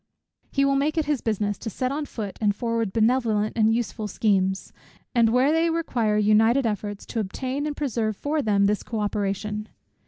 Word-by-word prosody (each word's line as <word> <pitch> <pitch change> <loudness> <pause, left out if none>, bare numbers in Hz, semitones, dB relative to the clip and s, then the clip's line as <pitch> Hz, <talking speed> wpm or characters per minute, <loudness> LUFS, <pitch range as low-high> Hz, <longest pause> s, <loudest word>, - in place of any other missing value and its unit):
He 275 0 +2
will 275 0 +2
make 300 +4 0
it 315 - +2
his 295 -4 0
business 205 -2 -1
to 225 - -4
set 255 +5 -2
on 290 +1 -3
foot 205 -4 -6
and 205 -2 +2
forward 230 -2 -1
benevolent 220 -1 +1
and 220 -1 +3
useful 225 -2 -2
schemes; 190 -2 0 0.4
and 235 -3 +4
where 255 +5 +3
they 325 +1 +2
require 240 -10 0
united 220 +5 +4
efforts, 205 -2 -3
to 230 - -4
obtain 260 +8 -3
and 295 - -4
preserve 225 -7 -1
for 300 +1 -1
them 200 -4 +2
this 205 +1 +1
co 225 - -4
operation. 210 +1 -2
225 Hz, 185 wpm, -25 LUFS, 210-265 Hz, 0.4 s, and